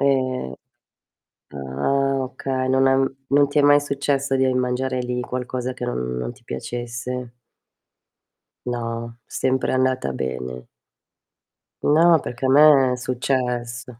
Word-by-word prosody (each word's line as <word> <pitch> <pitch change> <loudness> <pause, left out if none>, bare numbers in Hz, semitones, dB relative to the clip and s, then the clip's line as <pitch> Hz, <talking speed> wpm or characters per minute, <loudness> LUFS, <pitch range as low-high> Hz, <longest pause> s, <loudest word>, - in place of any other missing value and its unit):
Ehm, 130 - 0 0.9
ah, 75 - -1
oka 130 0 -3
non 130 +1 +3
è 135 - +4 0.3
non 140 0 +4
ti 145 - 0
è - - +5
mai 145 0 +6
successo 140 -1 -1
di 130 0 +2
mangiare 125 +1 -1
lì 125 0 -2
qualcosa 125 0 -4
che 125 - -6
non 60 - -3
non - - -4
ti - - -23
piacesse? 120 - -5 1.3
No, 115 -1 -4
sempre 130 0 0
andata 130 - +1
bene. 65 -1 -5 1.2
No, 165 +2 +5
perché 125 +1 -5
a - - +2
me 140 -2 +6
è - - -1
successo. 125 -1 -2
125 Hz, 125 wpm, -22 LUFS, 120-135 Hz, 1.3 s, mai